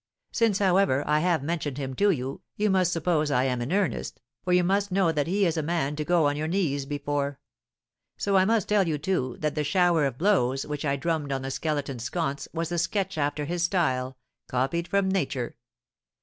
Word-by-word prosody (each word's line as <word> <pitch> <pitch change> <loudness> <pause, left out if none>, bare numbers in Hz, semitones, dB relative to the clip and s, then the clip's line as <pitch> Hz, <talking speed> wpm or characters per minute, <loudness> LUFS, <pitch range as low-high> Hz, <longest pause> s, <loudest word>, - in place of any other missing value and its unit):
Since, 225 -5 +2
however, 190 -8 +3
I 150 +1 +2
have 170 -3 +1
mentioned 150 -3 -2
him 135 -2 -4
to 205 - +4
you, 135 -6 -2
you 210 -1 +1
must 185 -2 +3
suppose 165 -3 +1
I 125 -3 +2
am 125 -2 0
in 120 +6 -3
earnest, 200 +1 -1 0.2
for 180 - -1
you 180 0 +4
must 200 +2 +1
know 185 -3 +3
that 150 -2 -1
he 195 +3 +2
is 165 -2 0
a - - +1
man 150 -2 -1
to 150 - -2
go 170 0 +3
on 145 0 +2
your 155 +1 -2
knees 155 -6 -1
before. 145 -1 -2 0.8
So 200 -1 0
I 190 - +6
must 220 0 +1
tell 205 -3 +3
you, 155 -2 0
too, 145 -6 -1
that 150 -1 0
the 150 - -1
shower 170 0 +3
of 130 -3 -6
blows 135 -8 +2
which 150 0 -4
I 140 -1 +1
drummed 155 -1 -2
on 135 -1 -2
the 135 - -3
Skeleton's 140 -5 -2
sconce 140 0 -2
was 165 0 -3
a 175 - 0
sketch 190 +3 -1
after 145 0 -1
his 175 +3 -2
style, 130 -8 0 0.3
copied 135 +7 -1
from 200 -1 +1
nature. 155 -10 -1
160 Hz, 210 wpm, -26 LUFS, 140-180 Hz, 0.8 s, I